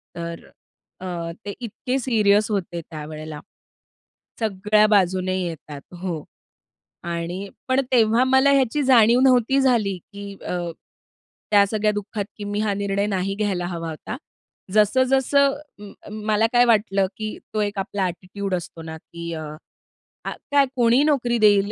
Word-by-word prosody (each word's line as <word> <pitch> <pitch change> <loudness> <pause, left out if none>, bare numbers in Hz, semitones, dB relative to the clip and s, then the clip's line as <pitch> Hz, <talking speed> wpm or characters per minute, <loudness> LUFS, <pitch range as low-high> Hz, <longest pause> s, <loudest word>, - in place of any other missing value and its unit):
तर 170 0 -6 0.6
अ, 175 -2 -4
ते - - -4
इतके 245 +3 -3
सीरियस 215 -4 +3
होते 175 -4 -2
त्यावेळेला 155 -1 -8 1.0
सगळ्या 210 0 +3
बाजूने 185 -2 +2
येतात. 155 -4 -6 0.2
हो. 170 -5 -3 0.8
आणि 170 +3 -4 0.2
पण 260 +1 +3
तेव्हा 230 -1 +4
मला 265 +1 +4
ह्याची 275 +1 +2
जाणीव 240 -2 +6
नव्हती 260 0 +4
झाली, 225 -8 +2
की 200 +2 -10
अ, - - -2 1.0
त्या 205 -1 +6
सगळ्या 215 +1 +1
दुःखात 205 0 -4
की 210 - -6
मी 205 - -1
हा 210 -1 +1
निर्णय 200 0 -1
नाही 195 -1 -1
घ्यायला 200 -4 -1
हवा 165 -2 -4
होता. 160 +9 -6 0.6
जसं 215 +5 +4
जसं 275 +1 +3 0.2
म 205 -1 -10
अ, - - -11
मला 215 +1 +1
काय 245 0 +6
वाटलं 205 -4 +2
की 215 -1 -4 0.2
तो 215 - 0
एक 205 -1 -2
आपला 195 0 -2
ॲटिट्यूड 185 +2 -4
असतो 175 -1 -7
ना, 160 0 -7
की 170 +1 -8
अ, 160 - -5 0.8
आ - - -2 0.2
काय 285 -1 +5
कोणीही 240 +2 +4
नोकरी 250 -6 +2
देईल, 205 -1 +4
205 Hz, 145 wpm, -23 LUFS, 180-230 Hz, 1.0 s, जाणीव